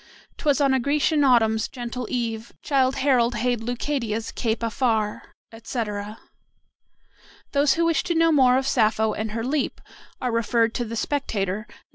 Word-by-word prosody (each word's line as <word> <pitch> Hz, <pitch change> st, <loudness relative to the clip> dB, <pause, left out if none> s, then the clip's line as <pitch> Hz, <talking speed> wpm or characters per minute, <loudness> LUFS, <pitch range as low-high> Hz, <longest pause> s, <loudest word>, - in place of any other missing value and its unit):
"'Twas 290 Hz, -1 st, +1 dB
on 275 Hz, -2 st, +3 dB
a 265 Hz, -, +3 dB
Grecian 290 Hz, +3 st, +2 dB
autumn's 225 Hz, -4 st, +3 dB
gentle 245 Hz, -1 st, -6 dB
eve 230 Hz, -2 st, -3 dB
Childe 265 Hz, -2 st, +2 dB
Harold 250 Hz, -3 st, +2 dB
hailed 240 Hz, +1 st, 0 dB
Leucadia's 235 Hz, -2 st, -2 dB
cape 230 Hz, 0 st, -2 dB
afar;" 225 Hz, -2 st, -1 dB, 0.2 s
etc. 220 Hz, -2 st, -5 dB, 1.3 s
Those 285 Hz, 0 st, +3 dB
who 335 Hz, 0 st, +1 dB
wish 330 Hz, -4 st, +2 dB
to 345 Hz, -, -1 dB
know 330 Hz, 0 st, +4 dB
more 260 Hz, -4 st, +5 dB
of 265 Hz, -, -1 dB
Sappho 220 Hz, -4 st, +2 dB
and 215 Hz, 0 st, -4 dB
her 225 Hz, 0 st, -3 dB
"leap" 275 Hz, +3 st, -1 dB, 0.4 s
are 250 Hz, -, -1 dB
referred 230 Hz, 0 st, +1 dB
to 240 Hz, -, -2 dB
the 230 Hz, +1 st, -6 dB
"Spectator," 215 Hz, -6 st, -2 dB
Nos. -, -, -18 dB
240 Hz, 155 wpm, -24 LUFS, 220-275 Hz, 1.3 s, more